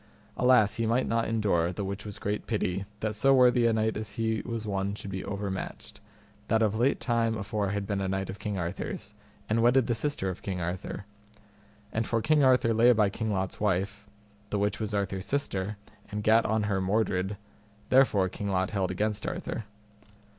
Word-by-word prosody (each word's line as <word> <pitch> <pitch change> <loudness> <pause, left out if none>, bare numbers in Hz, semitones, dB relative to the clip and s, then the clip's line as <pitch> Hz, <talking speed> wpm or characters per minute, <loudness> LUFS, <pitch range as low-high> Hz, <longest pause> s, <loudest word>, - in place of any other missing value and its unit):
Alas 125 -4 +4
he 115 -1 0
might 120 +3 +2
not 115 0 +1
endure, 100 -7 +1
the 100 +2 -4
which 100 +2 -5
was 100 - -6
great 105 +1 -3
pity, 100 -4 -1 0.2
that 110 0 -1
so 135 +6 +4
worthy 125 -2 +5
a - - +3
knight 110 0 +1
as 105 -1 -5
he 110 -2 -1
was 115 -2 -4
one 100 -1 -1
should 100 -2 -7
be 95 0 -4
overmatched, 100 -1 -5 0.5
that 110 0 +3
of 105 -2 +2
late 120 +5 +2
time 115 -2 +1
afore 105 -1 -2
had 100 0 -2
been 100 -1 -2
a 95 - -1
knight 95 0 -1
of 100 - -7
King 105 -2 -3
Arthur's, 85 -1 -4 0.3
and 110 +2 +1
wedded 120 +2 +4
the 120 - +1
sister 115 -4 -1
of 90 - -9
King 95 -2 -3
Arthur; 90 +3 -4 0.9
and 115 0 -1
for 115 - +1
King 150 +5 +3
Arthur 125 -3 +4
lay 115 +2 +6
by 105 -3 +2
King 110 +1 -2
Lot's 95 -2 -2
wife, 100 +1 -1 0.4
the 105 - -1
which 100 +1 0
was 110 -1 -2
Arthur's 95 -2 -2
sister, 105 -8 -1 0.3
and 105 0 -4
gat 110 +2 +4
on 110 0 +1
her 100 -2 0
Mordred, 95 0 0 0.5
therefore 130 -8 +4
King 100 +2 -5
Lot 95 +1 0
held 95 -3 0
against 105 +3 -1
Arthur. 115 - -4
105 Hz, 195 wpm, -28 LUFS, 95-115 Hz, 0.9 s, lay